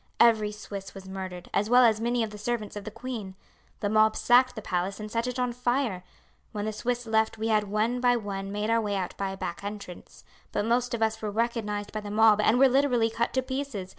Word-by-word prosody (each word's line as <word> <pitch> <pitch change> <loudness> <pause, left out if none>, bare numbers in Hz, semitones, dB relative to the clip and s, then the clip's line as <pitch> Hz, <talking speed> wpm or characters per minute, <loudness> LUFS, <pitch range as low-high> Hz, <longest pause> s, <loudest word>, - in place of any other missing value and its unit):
Every 220 -3 +5
Swiss 200 -2 -8
was 190 -1 -10
murdered, 185 -2 -6
as 210 +2 +1
well 250 +1 +7
as 220 -1 +3
many 240 0 +1
of 220 - -4
the 210 - -9
servants 215 -1 -3
of 205 - -6
the - - -4
queen. 230 -4 -6 0.5
The 205 - 0
mob 215 +1 +4
sacked 250 +1 +4
the 220 - -5
palace 185 +2 -2
and 215 0 -7
set 230 +1 -1
it 250 0 -3
on 250 -1 0
fire. 240 -6 -1 0.5
When 210 -1 -3
the 215 - -2
Swiss 245 +3 -2
left 220 0 +1
we 220 +1 -2
had 215 -1 +3
one 215 +4 0
by 245 -1 +4
one 195 -3 -4
made 210 +2 -1
our 230 0 +3
way 205 -2 -2
out 185 -2 -3
by 195 -1 -2
a 190 - -6
back 175 0 -5
entrance, 200 -3 -8 0.3
but 205 - -1
most 240 +1 +1
of 225 - -1
us 220 0 0
were 215 - -2
recognized 210 -2 -2
by 215 - -3
the 205 - -7
mob 215 0 +5
and 220 +3 +4
were 270 +1 +7
literally 250 -4 +2
cut 230 +1 -1
to 260 - +2
pieces. 260 -8 -4
220 Hz, 240 wpm, -27 LUFS, 205-240 Hz, 0.5 s, well